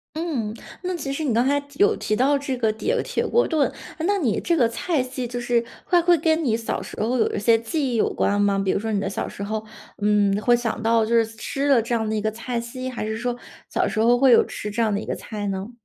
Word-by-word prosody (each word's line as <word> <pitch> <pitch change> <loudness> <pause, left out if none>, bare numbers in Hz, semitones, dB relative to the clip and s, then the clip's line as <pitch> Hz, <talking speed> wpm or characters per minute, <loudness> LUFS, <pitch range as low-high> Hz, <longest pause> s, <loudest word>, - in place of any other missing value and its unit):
嗯， 275 -11 -2 0.3
那 365 0 -2
其 280 -5 -3
实 310 - -3
你 255 -6 0
刚 240 +3 +2
才 285 +1 +3
提 285 +4 -19
有 420 +2 +5
提 215 - -1
到 280 +3 +3
这 275 -2 -3
个 225 -2 +1
铁 445 - -1
铁 - - -2
锅 480 - +2
炖， 310 -4 +2 0.3
诶， 325 - -3
那 405 +1 +2
你 255 - 0
这 340 -1 +1
个 240 -4 +4
菜 280 +5 -1
系 255 0 -4
就 245 +1 -4
是 240 -1 +1 0.2
会 350 -2 +4
会 345 0 +4
跟 320 +1 +1
你 225 -4 +1
小 230 - -3
时 - - -9
候 245 +4 +1
有 - - +1
一 - - -1
些 225 +2 +4
记 255 +3 -2
忆 - - 0
有 220 - +2
关 205 0 +1
吗？ 200 -1 +2
比 195 -1 +1
如 - - 0
说 220 +1 -3
你 205 - +1
的 195 -1 -2
小 - - -3
时 - - -10
候， 215 +1 -3 0.4
嗯， 205 -1 +3
会 240 - +4
想 235 -1 0
到 225 -1 +3
就 235 +1 +1
是 230 -1 +4
吃 250 +6 -3
了 250 -5 +5
这 235 +1 -1
样 220 -1 -1
的 - - -1
一 215 - 0
个 215 - 0
菜 235 +2 -4
系， 255 +2 -5
还 235 -4 -4
是 220 0 -2
说 245 +1 -2 0.3
小 - - 0
时 215 - -1
候 240 +2 +5
会 260 -1 +6
有 - - +6
吃 210 - -6
这 220 +3 -2
样 215 -2 +2
的 200 - 0
一 - - -6
个 - - -2
菜 205 -2 -5
呢？ 195 +4 -4
235 Hz, 305 characters per minute, -23 LUFS, 220-275 Hz, 0.4 s, 会